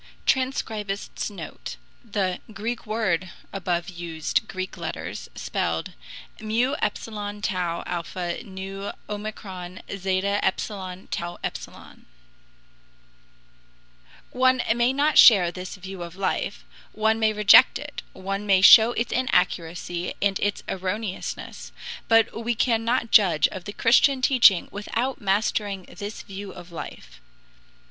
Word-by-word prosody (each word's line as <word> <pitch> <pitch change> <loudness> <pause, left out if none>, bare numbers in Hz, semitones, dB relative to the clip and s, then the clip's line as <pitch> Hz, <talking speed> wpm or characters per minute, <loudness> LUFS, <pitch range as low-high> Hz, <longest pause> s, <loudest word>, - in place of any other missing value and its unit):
[TRANSCRIBIST'S 220 -8 -1
NOTE: 205 - -8 0.3
The 200 -5 -1
GREEK 225 +2 -4
WORD 190 -5 0 0.2
above 175 -3 -1
used 170 -3 -2
Greek 185 0 -5
letters, 165 -3 -6
spelled: 85 -1 -2 0.5
mu 230 +5 0
epsilon 210 -1 -3
tau 180 -4 -1
alpha 175 0 -4
nu 195 +1 -6
omicron 195 -4 -7
zeta 195 +1 0
epsilon 190 -1 -3
tau 175 0 -4
epsilon] - - -8 2.2
One 255 0 +3
may 240 +1 +3
not 290 +3 +3
share 185 -7 +8
this 180 +1 -7
view 190 -1 -8
of 170 0 -7
life, 190 -1 -2 0.3
one 220 +1 +1
may 220 -1 +3
reject 215 +4 +7
it, 290 0 -7
one 195 +2 -4
may 190 -2 +5
show 220 +4 +9
its 235 - -2
inaccuracy 175 -7 -1
and 200 -1 +1
its 205 0 -1
erroneousness, 190 +2 -4 0.4
but 225 0 +3
we 240 +1 0
cannot 230 +1 +1
judge 180 -7 +5
of 185 -2 -8
the 205 - -5
Christian 260 +5 +4
teaching 245 -9 +5
without 235 +6 -3
mastering 200 -1 0
this 205 +4 -8
view 195 -1 -8
of 175 0 -12
life. 170 - -9
200 Hz, 115 wpm, -25 LUFS, 185-225 Hz, 2.2 s, show